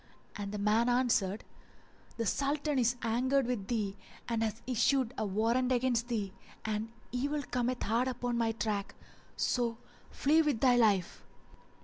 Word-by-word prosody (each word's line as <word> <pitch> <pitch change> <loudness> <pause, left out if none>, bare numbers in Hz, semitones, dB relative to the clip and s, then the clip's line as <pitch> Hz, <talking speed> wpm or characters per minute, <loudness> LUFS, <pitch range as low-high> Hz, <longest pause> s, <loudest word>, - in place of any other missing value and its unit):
and 200 -2 -4
the 210 - -4
man 215 +4 +2
answered, 230 -5 +1 0.7
"The 230 - -1
Sultan 285 +3 0
is 240 0 +2
angered 255 +4 +2
with 235 -6 -2
thee 210 -5 -1 0.3
and 230 -1 -1
hath 220 0 -2
issued 255 0 +2
a 215 - -2
warrant 230 +6 +1
against 245 -2 +1
thee, 210 -6 -2 0.3
and 220 +1 -2 0.2
evil 285 +4 -1
cometh 250 0 -1
hard 235 +4 +1
upon 245 -1 -2
my 230 -1 +1
track; 205 -2 -2 0.4
so 235 -2 0 0.3
flee 310 +4 +3
with 295 -7 +1
thy 250 -1 +5
life!" 205 -7 +2
235 Hz, 145 wpm, -32 LUFS, 220-255 Hz, 0.7 s, thy